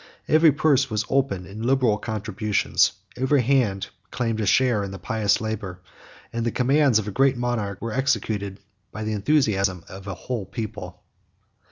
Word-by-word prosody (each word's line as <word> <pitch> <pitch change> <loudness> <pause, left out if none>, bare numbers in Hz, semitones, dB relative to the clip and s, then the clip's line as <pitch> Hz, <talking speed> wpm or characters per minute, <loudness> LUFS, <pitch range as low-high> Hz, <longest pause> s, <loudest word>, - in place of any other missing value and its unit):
Every 155 0 +6
purse 140 -1 +2
was 110 -3 -1
opened 130 -10 0
in 100 +3 -9
liberal 120 -3 +2
contributions, 110 -1 0 0.2
every 130 +1 +2
hand 115 -7 +1 0.2
claimed 115 -3 -2
a 105 - -1
share 120 -2 +3
in 100 - -4
the 95 - -7
pious 105 0 +1
labor, 105 -4 -4 0.5
and 115 0 -2
the 120 - +1
commands 135 +1 +3
of 110 -2 -1
a - - -3
great 135 +4 +3
monarch 115 -5 -2
were 115 -1 -3
executed 105 -7 -1 0.3
by 110 - -6
the 110 0 -2
enthusiasm 100 - +1
of 95 +1 -10
a 95 - -4
whole 115 -4 -5
people. 100 -5 -7
110 Hz, 165 wpm, -24 LUFS, 100-130 Hz, 0.5 s, Every